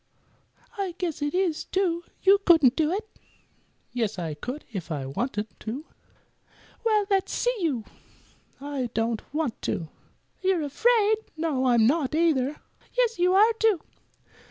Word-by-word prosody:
"I 375 -4 -2
guess 340 -5 -3
it 290 +3 -1
is, 365 -4 +1
too. 345 -3 0 0.2
You 395 +1 +6
couldn't 310 -9 +6
do 315 -1 +1
it." 425 +4 -2 0.9
"Yes, 225 -5 -1
I 165 -3 -3
could, 250 - -6
if 180 -4 -5
I 140 -4 -2
wanted 210 - -2
to." 250 +8 -5 1.0
"Well, 430 -3 +3
let's 385 -1 +2
see - - 0
you." 275 - -1 0.7
"I 275 -3 -3
don't 225 0 0
want 295 -5 -2
to." 160 -3 -3 0.5
"You're 370 -4 +2
afraid." 440 - +3 0.2
"No, 295 -5 0
I'm 235 -3 +5
not, 295 +2 +2
either." 300 -4 +2 0.4
"Yes, 470 -5 +2
you 365 +1 +4
are, 435 +4 +6
too." 440 -6 +3
310 Hz, 140 wpm, -26 LUFS, 245-380 Hz, 1.0 s, You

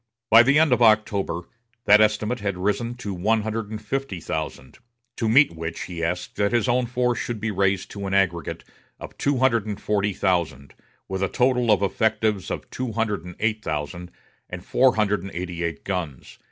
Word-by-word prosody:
By 115 +1 +10
the 140 +4 +4
end 155 -4 +4
of 125 - +1
October 110 -5 +2 0.4
that 105 +1 +7
estimate 110 +3 +1
had 100 -3 -3
risen 105 +6 -1
to 105 -5 -5
one 105 +5 +1
hundred 110 -1 -3
and 110 -1 -5
fifty 110 -3 -4
thousand, 75 -5 -5 0.4
to 115 -3 0
meet 135 - +5
which 80 0 -5
he 85 -2 -5
asked 90 +1 -3
that 100 +2 +1
his 120 -3 +2
own 125 0 +1
force 125 0 0
should 120 -3 -4
be 110 +1 -2
raised 95 -1 0
to 100 -1 -5
an 95 - -3
aggregate 85 -5 0 0.4
of - - -10
two 140 -1 +1
hundred 115 -4 +2
and 105 -2 -4
forty 105 -1 0
thousand, 85 -8 -1 0.3
with 95 0 -4
a 95 - +1
total 125 -1 +1
of 100 -2 +4
effectives 105 0 0
of - - -5
two 125 -3 -4
hundred 105 -5 -1
and 90 -1 -9
eight 110 0 -1
thousand, 80 +3 -4 0.4
and 90 0 -8
four 130 +1 +3
hundred 105 -2 +1
and 95 - -7
eighty 90 -1 -4
eight 85 -1 -4
guns. 85 -9 -5
105 Hz, 195 wpm, -24 LUFS, 90-115 Hz, 0.4 s, By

